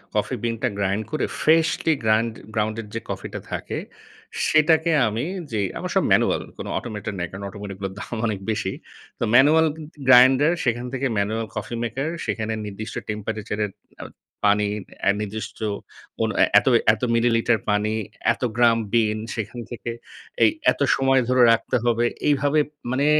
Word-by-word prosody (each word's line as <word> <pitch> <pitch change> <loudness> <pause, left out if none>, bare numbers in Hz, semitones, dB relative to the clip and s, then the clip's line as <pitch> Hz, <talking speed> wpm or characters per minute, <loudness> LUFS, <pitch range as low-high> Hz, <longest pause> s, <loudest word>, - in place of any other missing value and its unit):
Coffee 105 +5 0
বিন 115 -1 0
টা 130 - +2
grind 100 +2 0
করে, 155 - 0 0.2
freshly 160 0 +3
grind 110 +1 +2 0.2
গ্রাউনডেড 110 0 -2
যে - - -1
কফি - - -4
টা - - -4
থাকে। - - -4 0.7
সেটাকে 160 +2 +4 0.2
আমি 110 +4 -2 0.3
যে, 110 - -1 0.2
আমার - - -4
সব - - +4
ম্যানুয়াল। - - +3 0.2
কোনো - - -6
অটোমেটেড 105 -3 -5
নেই। 90 - -2
কারণ 100 +1 -8
অটোমেটেড 100 -2 -8
গুলোর 95 -1 -4
দাম 120 - -6
অনেক 105 -3 -2
বেশি। 105 -3 -2 0.5
তো - - -1
ম্যানুয়াল 155 +5 +6
গ্য 155 +1 -4 0.2
গ্য 145 - -11
গ্রাইন্ডার, 130 +4 +7
সেখান 120 0 0
থেকে 135 +1 -2
ম্যানুয়াল 110 +3 0
কফি 105 +3 -4
মেকার। 135 +6 -2 0.2
সেখানে 110 0 -2
নির্দিষ্ট 105 +3 -7
টেম্পারেচার 105 0 -4
এর 100 - -7 0.3
এ - - -6 0.5
পানি, 105 0 +1 0.3
অ্যা 100 - +4
নির্দিষ্ট 105 +1 -5 0.6
কোন 110 - 0 0.3
এত - - -10 0.3
এত 110 - -6
মিলিলিটার 115 0 +3
পানি, 105 +1 +1 0.4
এত - - -15 0.2
গ্রাম 115 -1 +5 0.2
বিন, 110 -2 +2 0.2
সেখান 115 +2 -5
থেকে 120 0 -5 0.5
এই - - +7 0.2
এত - - -6
সময় 135 0 +3
ধরে 125 0 +3
রাখতে 115 - +1
হবে। 120 0 +2 0.2
এইভাবে, 145 +1 +3 0.3
মানে 140 +3 +1
115 Hz, 165 wpm, -23 LUFS, 105-130 Hz, 0.7 s, গ্রাইন্ডার